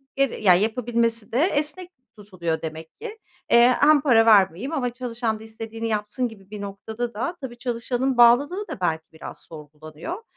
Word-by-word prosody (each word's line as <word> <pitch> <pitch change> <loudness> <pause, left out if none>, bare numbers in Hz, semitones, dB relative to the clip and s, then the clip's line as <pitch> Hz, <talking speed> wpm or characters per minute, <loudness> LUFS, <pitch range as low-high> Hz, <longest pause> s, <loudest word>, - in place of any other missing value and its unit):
geri 275 -5 -1
ya, 185 -3 +7
yapabilmesi 230 +1 0
de 235 - -1
esnek 330 +2 -1 0.3
tutuluyor 175 -5 -4
demek 160 0 -8
ki. 450 -1 -7 0.3
Eee, 235 +1 +7
hem 295 -1 +5
para 235 -6 +4
vermeyeyim 210 - +4
ama 250 -6 -1
çalışan 235 -3 -3
da - - -12
istediğini 225 +1 -6
yapsın 215 +4 -2
gibi 200 -4 -15
bir 210 -1 -8
noktada 220 +4 -5
da 340 +12 -3
tabii, 245 -3 -7
çalışanın 245 +1 -2
bağlılığı 285 - +4
da - - -7
belki 160 -2 0
biraz 160 - -9
sorgulanıyor, 155 - -9
230 Hz, 160 wpm, -23 LUFS, 200-255 Hz, 0.3 s, ya